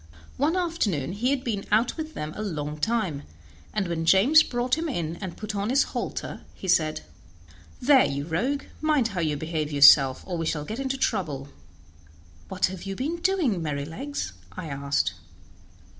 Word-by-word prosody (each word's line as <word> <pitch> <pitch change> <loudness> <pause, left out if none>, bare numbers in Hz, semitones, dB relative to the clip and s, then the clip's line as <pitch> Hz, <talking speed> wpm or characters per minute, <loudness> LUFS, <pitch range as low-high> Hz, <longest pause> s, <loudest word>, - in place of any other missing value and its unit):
One 300 +6 +2
afternoon 230 - -1
he 220 +7 0
had 270 -2 0
been 210 -6 -2
out 225 +3 +3
with 315 -2 -6
them 150 +1 -4
a - - -5
long 150 -7 -4
time, 190 -7 0 0.5
and 205 -3 -1
when 170 -1 -2
James 200 - +6
brought 245 -2 0
him 325 +1 -3
in 170 - -3
and 185 -4 -7
put 215 0 -5
on 200 +2 -1
his 270 +3 +4
halter - - -5
he 190 - -8
said: 155 -3 +2 0.8
"There, 265 +1 +6
you 140 +1 -2
rogue, 245 - -1 0.2
mind 300 -7 +2
how 190 -4 -4
you 155 -3 0
behave 155 0 -3
yourself, 140 -2 +7
or 175 -3 -4
we 165 - -1
shall 150 -2 -2
get 220 - -5
into 270 0 -2
trouble." 155 - -1 1.0
"What 185 -1 +1
have 185 -1 -5
you 195 +1 -5
been 300 - -2
doing, 335 - +1
Merrylegs?" 160 - -4 0.2
I 155 - -6
asked. 140 -7 0
195 Hz, 175 wpm, -26 LUFS, -, 1.0 s, yourself